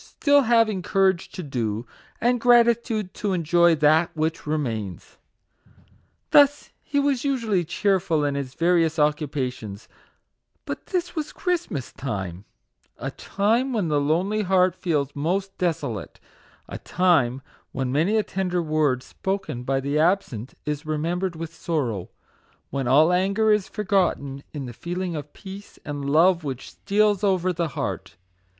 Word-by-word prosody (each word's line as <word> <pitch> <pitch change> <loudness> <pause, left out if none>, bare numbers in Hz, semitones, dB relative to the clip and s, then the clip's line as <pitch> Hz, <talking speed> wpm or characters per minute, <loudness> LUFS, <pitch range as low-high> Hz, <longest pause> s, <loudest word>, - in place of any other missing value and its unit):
still 285 -1 +3
having 225 -5 +3
courage 190 -2 +1
to 185 - -7
do, 115 -5 -3 0.3
and 245 0 +1
gratitude 235 -4 +3
to 205 -2 -2
en 175 -2 -1
joy 170 +1 +4
that 155 +2 +4
which 160 0 -2
remains. 115 - -3 1.1
Thus, 290 0 +5
he 285 - -1
was 280 -3 +1
usually 230 -10 +1
cheerful 170 -4 +1
in 145 - 0
his 140 -2 -4
various 165 -2 +2
occupations; 140 -8 -1 0.8
but - - -6
this 360 -3 -2
was 305 -2 -3
Christmas 345 - -2
time: 95 -7 -5 0.5
a - - -4
time 230 +7 0
when 205 -8 0
the 145 -1 +2
lonely 180 +9 +1
heart 185 -2 +3
feels 145 -7 -1
most 190 +7 -1
desolate 150 - -2 0.5
a - - -7
time 145 -8 +2 0.3
when 130 -2 -2
many 165 +11 +2
a 215 - +2
tender 180 -2 -2
word 155 -6 +1
spoken 175 -5 -4
by 135 +2 0
the 140 +3 -1
absent 155 - 0
is 150 0 -3
remembered 170 +4 -2
with 165 0 -6
sorrow 130 - -2 0.6
when 135 -2 -2
all 155 +7 +5
anger 200 +4 +2
is 210 -2 +2
forgotten 180 -9 0
in 145 -3 -5
the 120 - -7
feeling 175 +5 -4
of 150 -1 -6
peace 195 +1 -11
and 145 -2 -4
love 170 +3 +4
which 135 -3 -5
steals 210 0 +1
over 185 -2 +2
the 170 0 -1
heart. - - -4
170 Hz, 145 wpm, -24 LUFS, 145-200 Hz, 1.1 s, Thus